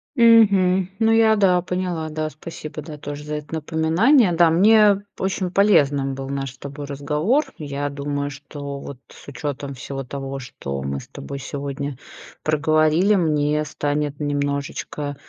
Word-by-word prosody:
Мгм. 200 Hz, -6 st, +5 dB
Ну 225 Hz, 0 st, +3 dB
я, 220 Hz, -1 st, +5 dB
да, 180 Hz, -3 st, +4 dB
поняла, 180 Hz, -3 st, -3 dB
да, 155 Hz, 0 st, -3 dB
спасибо, 155 Hz, 0 st, -8 dB
да, 150 Hz, 0 st, -9 dB
тоже 145 Hz, 0 st, -7 dB
за 150 Hz, 0 st, -4 dB
это 150 Hz, +1 st, -6 dB
напоминание. 170 Hz, -, +3 dB
Да, 165 Hz, -1 st, +5 dB
мне 205 Hz, +3 st, +5 dB
очень 190 Hz, -1 st, -2 dB
полезным 145 Hz, -9 st, +3 dB
был 135 Hz, 0 st, -6 dB
наш 135 Hz, -1 st, -3 dB
с 130 Hz, -, -19 dB
тобой 140 Hz, +1 st, -7 dB
разговор. 150 Hz, -, 0 dB
Я 145 Hz, -1 st, -3 dB
думаю, 145 Hz, 0 st, -3 dB
что 140 Hz, 0 st, -7 dB
вот 140 Hz, -2 st, -8 dB
с -, -, -15 dB
учетом 140 Hz, 0 st, -5 dB
всего 135 Hz, +1 st, -6 dB
того, 135 Hz, +1 st, -6 dB
что 70 Hz, -, -6 dB
мы 70 Hz, 0 st, -3 dB
с -, -, -12 dB
тобой 140 Hz, 0 st, -8 dB
сегодня 140 Hz, 0 st, -5 dB, 0.5 s
проговорили, 155 Hz, +5 st, +3 dB
мне 150 Hz, -4 st, +1 dB
станет 145 Hz, -1 st, -2 dB
немножечко, 145 Hz, 0 st, -3 dB
150 Hz, 150 wpm, -22 LUFS, 140-180 Hz, 0.5 s, Мгм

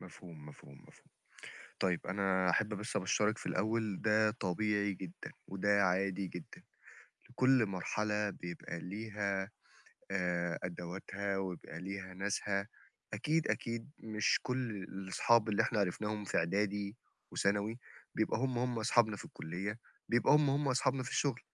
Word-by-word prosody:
مفهوم، 80 Hz, -5 st, -11 dB
مفهوم، 70 Hz, -1 st, -13 dB
مفهوم. -, -, -20 dB, 0.7 s
طيب 90 Hz, -2 st, 0 dB
أنا 95 Hz, -1 st, +2 dB
أحب 105 Hz, +4 st, +2 dB
بس 105 Hz, +3 st, -4 dB
أبشَّرِك 105 Hz, +3 st, +2 dB
في -, -, -9 dB
الأول 110 Hz, 0 st, 0 dB
ده 110 Hz, 0 st, +4 dB
طبيعي 100 Hz, +1 st, 0 dB
جدًا 90 Hz, -2 st, -8 dB, 0.2 s
وده 100 Hz, +1 st, +3 dB
عادي 95 Hz, +1 st, +1 dB
جدًا، 90 Hz, -2 st, -9 dB, 0.7 s
لكل 130 Hz, -1 st, +4 dB
مرحلة 105 Hz, +2 st, 0 dB
بيبقى 85 Hz, -1 st, -6 dB
ليها 100 Hz, 0 st, -2 dB, 0.6 s
آآ 90 Hz, -2 st, 0 dB
أدواتها 95 Hz, +3 st, -3 dB
ويبقى 90 Hz, -3 st, -4 dB
ليها 95 Hz, 0 st, -5 dB
ناسها، 100 Hz, +1 st, -1 dB, 0.5 s
أكيد، 155 Hz, +1 st, +1 dB
أكيد 115 Hz, +2 st, -2 dB
مش 110 Hz, -1 st, +2 dB
كل 125 Hz, -1 st, -1 dB
الأصحاب 105 Hz, +4 st, +2 dB
اللي 105 Hz, -, +3 dB
إحنا 110 Hz, -, +1 dB
عرفناهم 105 Hz, +2 st, -1 dB
في -, -, 0 dB
إعدادي 100 Hz, +4 st, 0 dB, 0.4 s
وثانوي 105 Hz, +4 st, +1 dB, 0.4 s
بيبقى 110 Hz, 0 st, +1 dB
هم، 130 Hz, -1 st, 0 dB
هم 120 Hz, -1 st, 0 dB
أصحابنا 110 Hz, -2 st, +4 dB
في -, -, -8 dB
الكُلّية، 95 Hz, +7 st, -5 dB, 0.3 s
بيبقى 120 Hz, +4 st, +5 dB
هم، 150 Hz, -1 st, +5 dB
هم 140 Hz, +1 st, +1 dB
أصحابنا 130 Hz, +1 st, +2 dB
في 125 Hz, -, -5 dB
الشُغل، 135 Hz, -4 st, +1 dB
100 Hz, 135 wpm, -35 LUFS, 95-110 Hz, 0.7 s, بيبقى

